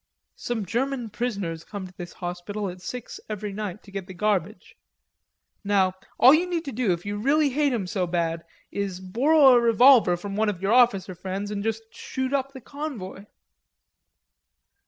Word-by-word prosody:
"Some 230 -4 -3
German 245 +2 -2
prisoners 200 -8 -3
come 200 -2 -7
to 185 - -12
this 175 -1 -8
hospital 180 +4 -5
at 180 0 -12
six 250 +5 -7
every 210 -1 -4
night 210 -1 -5
to 200 - -15
get 195 -2 -5
the 190 - -9
garbage; 210 +1 -1 0.9
now 195 -2 +2 0.3
all 260 - +9
you 350 +4 +2
need 340 -2 -2
to 275 - -4
do 235 -4 0
if 175 +1 -2
you 205 0 -3
really 285 +5 +3
hate 285 +1 +1
'em 225 -6 -1
so 180 -1 -2
bad 170 -1 -1 0.3
is 195 -3 -3
borrow 270 +10 +4
a 245 -2 +6
revolver 235 -5 +6
from 195 +3 -6
one 215 +1 +2
of 195 -4 -4
your 195 +4 +1
officer 205 -7 +4
friends, 190 +3 -5
and 205 -1 -3
just 225 0 -2
shoot 260 +1 -4
up 275 -1 0
the 265 -1 -11
convoy...." 235 -10 -7
210 Hz, 175 wpm, -25 LUFS, 185-250 Hz, 0.9 s, all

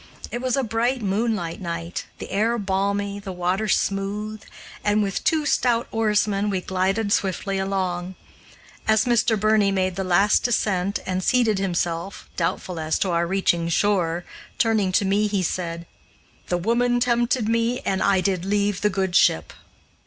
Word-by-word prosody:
It 240 - -3
was 255 0 0
a 270 - +1
bright 235 +2 0
moonlight 200 -4 -1
night, 170 -1 -5
the - - -8
air 225 +4 +1
balmy, 200 0 -1
the 195 -1 -7
waters 185 +4 0
smooth, 205 +2 -3 0.4
and, 210 0 +2
with 195 -1 -2
two 310 -2 +2
stout 240 -5 +1
oarsmen, 210 -2 +1
we 195 -2 0
glided 195 +3 0
swiftly 195 0 -1
along. 185 -2 -2 0.7
As 220 0 +4
Mr. 235 -2 +2
Birney 215 -1 +3
made 185 -1 0
the 190 - -1
last 190 +3 +3
descent 200 -5 0
and 185 0 -2
seated 230 -4 +2
himself, 175 0 -2
doubtful 170 0 -2
as 155 0 0
to 190 - 0
our 170 0 +1
reaching 175 -2 +1
shore, 175 -2 +1 0.3
turning 220 -5 +2
to 200 +2 +2
me 205 +2 +2
he 200 -2 0
said: 170 -1 -3 0.6
"The 175 - 0
woman 240 +6 +1
tempted 240 -1 +1
me 230 +2 +1
and 190 - -1
I 195 -2 +3
did 185 -2 0
leave 205 0 0
the 210 - +3
good 190 -2 -1
ship." 80 - +3
200 Hz, 160 wpm, -23 LUFS, 185-220 Hz, 0.7 s, As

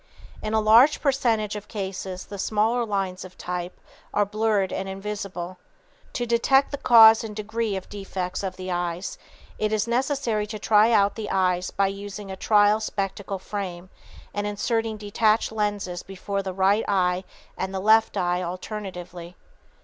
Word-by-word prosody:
In 215 +1 -2
a - - +4
large 230 +7 +6
percentage 230 -7 +1
of 210 0 -7
cases 190 -3 -5
the 200 - -8
smaller 225 +4 +1
lines 195 -3 -2
of 185 -1 -12
type 180 0 -5 0.4
are 205 - +3
blurred 210 -2 0
and 195 0 -3
invisible. 190 -2 -5 0.5
To 245 - -1
detect 240 +4 +3
the 285 - -4
cause 225 -2 +8
and 215 -2 -6
degree 220 0 -2
of 190 - -6
defects 190 -2 -4
of 190 -2 -4
the 185 0 -6
eyes 175 +1 -3 0.4
it 215 0 0
is 215 +1 0
necessary 240 -3 0
to 215 0 -5
try 215 +2 +4
out 205 -2 +4
the 215 -2 -5
eyes 180 -1 +1
by 200 - +1
using 200 0 -5
a - - -4
trial 210 +2 +4
spectacle 195 -2 -3
frame 185 -2 -6 0.4
and 205 0 -2
inserting 225 +1 -1
detached 215 +2 +1
lenses 205 -4 -2
before 195 +1 -4
the 190 -1 -4
right 195 +3 +2
eye 185 -2 +1 0.3
and 190 - -3
the 190 - -3
left 220 +3 +4
eye 180 0 0
alternately. 180 -1 -6
205 Hz, 160 wpm, -25 LUFS, 185-220 Hz, 0.5 s, cause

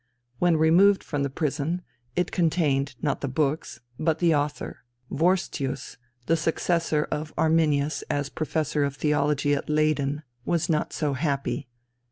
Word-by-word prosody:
When 175 -2 +3
removed 180 +6 +5
from 145 -2 -3
the 140 - 0
prison 155 +4 -2 0.3
it 180 0 0
contained, 150 -6 +1
not 145 - 0
the 140 - -1
books, 140 +2 -1 0.2
but 160 0 +1
the 170 -1 +3
author. 145 0 -2 0.3
Vorstius, 160 -5 0 0.3
the 165 - +3
successor 165 -1 0
of 155 +1 -3
Arminius 155 -2 +2
as 145 -1 0
Professor 155 -1 -1
of 140 -1 -1
Theology 145 0 +1
at 140 - -2
Leyden, 150 -1 +1 0.2
was 170 +4 0
not 155 -2 +1
so 150 -3 -1
happy. 140 -1 -2
150 Hz, 140 wpm, -26 LUFS, 145-165 Hz, 0.3 s, removed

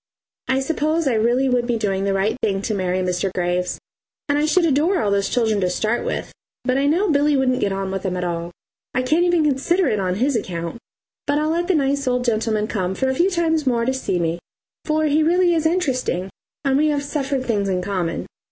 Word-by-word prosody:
I 260 +1 +1
suppose 310 +2 0
I 260 - +2
really 240 +4 +2
would 245 -2 +1
be 240 -2 +1
doing 195 -3 -1
the 200 - +1
right 195 +3 +1
thing 195 -1 0
to 215 - -1
marry 185 -2 -1
Mr. 180 +1 -1
Graves, 180 0 -1 0.5
and 285 - +1
I 295 +1 +2
should 345 +2 +3
adore 325 +5 +2
all 205 - 0
those 200 0 +1
children 220 -4 +1
to 180 - +1
start 215 +6 -1
with, - - -3 0.3
but 255 0 +1
I 275 +1 +2
know 350 +5 +2
Billy 290 0 +3
wouldn't 255 -1 +1
get 200 - 0
on 195 0 -3
with 195 -1 -3
them 185 -2 -2
at 180 - -2
all. 170 -1 -3 0.5
I 255 - +1
can't 315 +7 +2
even 350 -2 +3
consider 300 +5 +1
it 215 -3 0
on 185 -1 -1
his 260 +6 +1
account, 170 -1 -4 0.5
but 285 0 +2
I'll 305 +1 +1
let 345 +1 0
the 375 - +2
nice 280 -1 0
old 250 0 +1
gentleman 220 -2 0
come 190 -4 -2
for 265 +4 0
a 265 - 0
few 350 +7 +3
times 325 -5 0
more 235 -2 +2
to 260 - +1
see 260 -8 -1
me, 170 0 -1 0.5
for 310 0 +1
he 305 +1 +3
really 350 +2 +3
is 320 -1 +2
interesting, 255 - -1 0.3
and 270 0 +3
we 305 - +3
have 290 -1 0
suffered 280 -2 -2
things 205 -5 0
in 180 -1 -1
common. 180 -4 -2
255 Hz, 230 wpm, -21 LUFS, 195-300 Hz, 0.5 s, should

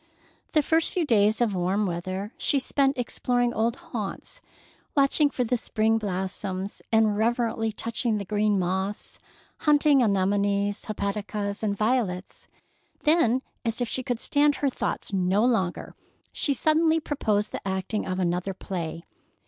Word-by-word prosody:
The 305 - +4
first 325 +3 +1
few 350 -3 +1
days 215 -3 +3
of 230 -4 +2
warm 190 +3 0
weather 185 +4 -4
she 285 - +1
spent 275 0 +1
exploring 245 0 0
old 230 +2 +1
haunts, 235 - -7 0.6
watching 280 +2 +4
for 255 - -1
the 245 +1 0
spring 225 0 +1
blossoms, 190 0 -4
and 220 -2 +4
reverently 225 0 0
touching 230 +1 -1
the 200 - -4
green 210 +1 +1
moss, 190 +3 -2 0.4
hunting 295 -2 +4
anemones, 200 -1 +1
hepaticas, 200 0 -3
and 205 -2 -1
violets. 215 -5 -1 0.6
Then, 270 -5 +3 0.2
as 230 -1 -2
if 245 - 0
she 255 - -1
could 245 -2 -2
stand 290 +2 +2
her - - -2
own - - -8
thoughts 205 - -3
no 190 +3 +2
longer, 195 -8 0 0.4
she 280 - +1
suddenly 315 +3 +3
proposed 215 -9 -1
the - - -6
acting 190 +3 -2
of 185 0 -2
another 180 +1 -1
play. 170 -3 -5
215 Hz, 145 wpm, -26 LUFS, 195-250 Hz, 0.6 s, The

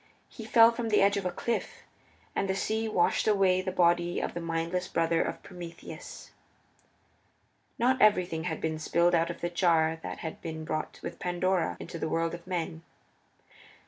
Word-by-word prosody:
He 225 - -9
fell 230 +1 +7
from 230 -1 -3
the 210 - +4
edge 200 +1 +4
of 195 -2 -1
a - - -2
cliff, 235 +6 -3 0.5
and 195 - 0
the 190 - +1
sea 220 +3 -1
washed 175 0 +2
away 190 -3 +3
the 185 0 -3
body 175 -1 +2
of - - -3
the 175 - -4
mindless 165 +2 -2
brother 165 0 +1
of - - -3
Prometheus. 175 -3 -10 1.5
Not 255 +2 +2
everything 180 -6 +3
had 160 -3 -2
been 160 -1 -2
spilled 170 +2 +2
out 165 0 +2
of 170 - -6
the 175 - -1
jar 165 -2 +2
that - - -6
had 160 - -6
been 160 -1 -6
brought 155 0 -4
with - - -6
Pandora 180 -1 0
into 165 - -7
the 160 - -2
world 165 +1 0
of 170 0 -9
men. 165 -3 -3
175 Hz, 175 wpm, -29 LUFS, 165-195 Hz, 1.5 s, fell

